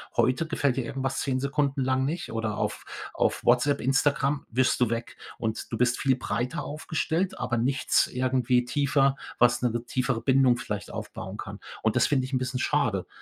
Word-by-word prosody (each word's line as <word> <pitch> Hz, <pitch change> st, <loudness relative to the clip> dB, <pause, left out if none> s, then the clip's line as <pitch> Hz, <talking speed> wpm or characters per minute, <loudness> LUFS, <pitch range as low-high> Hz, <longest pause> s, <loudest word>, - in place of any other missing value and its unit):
Heute 130 Hz, +6 st, +2 dB
gefällt 140 Hz, -5 st, 0 dB
dir 130 Hz, -, -1 dB
irgendwas 135 Hz, +2 st, -2 dB
10 130 Hz, -2 st, 0 dB
Sekunden 140 Hz, 0 st, 0 dB
lang 130 Hz, 0 st, +1 dB
nicht 160 Hz, +6 st, -3 dB
oder 110 Hz, -2 st, -2 dB
auf -, -, -3 dB, 0.3 s
auf -, -, 0 dB
Whatsapp, 125 Hz, +4 st, +3 dB
Instagram, 140 Hz, +2 st, +1 dB
wischst 130 Hz, +3 st, +2 dB
du 120 Hz, -3 st, +3 dB
weg 115 Hz, 0 st, -4 dB, 0.2 s
und 110 Hz, -1 st, -3 dB
du -, -, 0 dB
bist 120 Hz, 0 st, +2 dB
viel 135 Hz, -2 st, +3 dB
breiter 125 Hz, -1 st, -2 dB
aufgestellt, 160 Hz, +4 st, -2 dB
aber 120 Hz, -, -1 dB
nichts 130 Hz, +3 st, +2 dB
irgendwie 125 Hz, -1 st, +1 dB
tiefer, 140 Hz, +1 st, +2 dB, 0.2 s
was 120 Hz, 0 st, +4 dB
'ne 125 Hz, -, +2 dB
ge 120 Hz, +1 st, -2 dB
tiefere 130 Hz, -1 st, -1 dB
Bindung 130 Hz, 0 st, +4 dB
vielleicht 105 Hz, -5 st, -5 dB
aufbauen 95 Hz, +2 st, -6 dB
kann 100 Hz, 0 st, -7 dB, 0.2 s
und 110 Hz, -1 st, +2 dB
das -, -, +4 dB
finde 135 Hz, -3 st, +1 dB
ich 130 Hz, -, -8 dB
'n 130 Hz, -, +3 dB
bisschen 130 Hz, 0 st, -2 dB
schade, 125 Hz, -11 st, 0 dB
130 Hz, 185 wpm, -27 LUFS, 120-140 Hz, 0.3 s, was